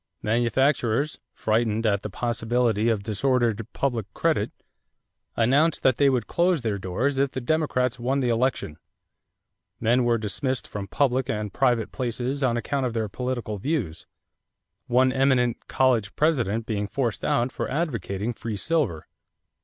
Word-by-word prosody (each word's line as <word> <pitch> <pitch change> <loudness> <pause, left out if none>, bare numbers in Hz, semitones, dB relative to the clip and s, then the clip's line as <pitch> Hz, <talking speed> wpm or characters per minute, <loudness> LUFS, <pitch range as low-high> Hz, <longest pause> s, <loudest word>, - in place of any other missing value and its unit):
Manufacturers, 120 +4 +1
frightened 110 0 0
at 100 -2 +2
the - - -5
possibility 120 -1 0
of 110 -3 0
disordered 115 0 0
public 120 -6 -2
credit, - - +1 0.8
announced 140 +7 +2
that 130 -3 +4
they 140 -1 +5
would 125 -5 0
close 170 -5 +1
their 105 -3 -1
doors 125 +10 -1
if 140 0 +2
the 130 - -4
Democrats 125 -3 0
won 130 +3 0
the 125 -2 +1
election. 115 -9 0 1.0
Men 120 +3 +3
were 120 -1 +2
dismissed 130 +4 -3
from 100 -1 -6
public 130 0 +1
and 105 -5 -3
private 120 -4 +1
places 125 +2 -2
on 120 -3 +2
account 135 +2 -1
of 120 - -4
their 110 -2 -1
political 120 -2 -3
views, 120 - -2 0.8
one 130 +1 +3
eminent 130 -3 +1
college 120 -6 +1
president 120 -8 +1
being 105 -2 -2
forced 120 -1 -2
out 120 +2 +1
for - - -4
advocating 120 - -2
free 110 -2 -5
silver. 115 - 0
120 Hz, 145 wpm, -25 LUFS, 110-135 Hz, 1.0 s, they